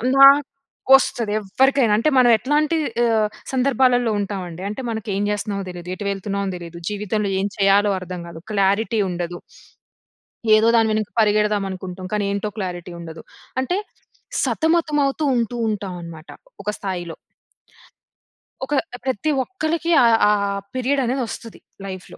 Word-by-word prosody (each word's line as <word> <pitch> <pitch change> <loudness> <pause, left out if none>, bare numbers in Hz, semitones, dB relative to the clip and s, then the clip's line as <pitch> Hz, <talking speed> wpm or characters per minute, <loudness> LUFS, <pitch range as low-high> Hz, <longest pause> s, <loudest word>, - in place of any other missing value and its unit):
నాకొస్తది. 275 -4 +4
ఎవ్వరికైనా, 255 +3 +2
అంటే 230 +8 +2
మనం 245 -1 +6
ఎట్లాంటి 300 +7 +1 0.3
ఆహ్, 220 -2 +2 0.3
సందర్భాలలో 250 -3 +2
ఉంటామండి. 185 -3 -5
అంటే 235 +5 -5
మనకు 220 -1 -5
ఏం 200 - 0
జేస్తున్నామో 200 -1 -3
తెలీదు. 175 0 -9
ఎటు 205 - -7
వెళ్తున్నామో 200 0 -3
తెలీదు. 170 0 -9
జీవితంలో 210 0 -2
ఏం 195 - 0
చేయాలో 200 +1 +4
అర్థం 180 -1 -6
గాదు. 165 -1 -10
క్లారిటీ 200 +3 +1
ఉండదు. 175 0 -4 1.2
ఏదో 215 +1 +4
దాని 225 -1 +4
వెనక 215 -1 -1
పరిగెడదాం 210 -1 +2
అనుకుంటాం. 185 0 -7
కానీ 210 - 0
ఏంటో 200 +1 -2
క్లారిటీ 180 -3 -5
ఉండదు. 165 -1 -9 0.4
అంటే 355 +9 -1 0.7
సతమతమవుతూ 310 -3 +1
ఉంటూ 235 0 -1
ఉంటాం 205 -3 -3
అనమాట 165 -1 -10 0.3
ఒక 210 - -2
స్థాయిలో. 175 -4 -5 1.5
ఒక 290 - -4 0.3
ప్రతి 265 +4 -1
ఒక్కరికి 335 +1 -2
ఆహ్, 230 -1 +5
ఆ - - +5 0.4
పీరియడ్ 265 +2 0
అనేది 255 +2 -1
వస్తది 230 0 -8 0.3
లైఫ్‌లో. 185 -2 -8
210 Hz, 130 wpm, -21 LUFS, 190-260 Hz, 1.5 s, మనం